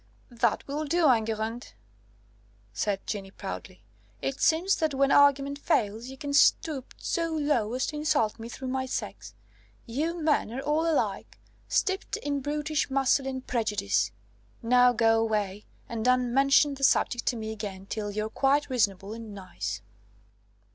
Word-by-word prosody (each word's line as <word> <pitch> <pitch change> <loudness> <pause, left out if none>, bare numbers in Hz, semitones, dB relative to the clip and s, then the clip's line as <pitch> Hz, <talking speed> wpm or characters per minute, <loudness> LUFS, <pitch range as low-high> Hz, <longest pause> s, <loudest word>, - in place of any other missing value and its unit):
"That 235 -2 0
will 295 +2 -3
do, 330 +2 +2
Enguerrand," 225 - -2 1.0
said 200 - -2
Jeanne 195 -2 -4
proudly; 190 -1 -7 0.4
"it 135 0 -3
seems 345 +5 +3
that 315 -3 0
when 275 +1 +3
argument 285 0 +4
fails, 220 -3 0
you 265 +1 -9
can 285 +1 -5
stoop 285 -1 +2
so 335 -2 -2
low 290 -8 0
as 255 - 0
to 300 - -4
insult 270 -8 +1
me 230 +1 -7
through 260 +2 -6
my 260 0 -2
sex. - - -5 0.5
You 310 +9 -2
men 305 -8 +1
are 255 - -4
all 305 +4 +1
alike, 310 - -2 0.3
steeped 380 +1 0
in 285 -1 -2
brutish 300 +2 -1
masculine 270 0 +1
prejudice. 210 - 0 0.5
Now 250 +1 +5
go 225 -1 +3
away, 210 -2 -2 0.2
and 230 -2 -4
don't 250 0 +2
mention 275 +2 +4
the 275 0 -8
subject 240 -2 +2
to 250 - +2
me 220 -1 -4
again 200 -3 -6
till 210 +1 -4
you're 215 +1 -2
quite 280 +4 +1
reasonable 205 -4 0
and 225 -2 -8
nice." 110 - -5
250 Hz, 150 wpm, -28 LUFS, 215-285 Hz, 1.0 s, Now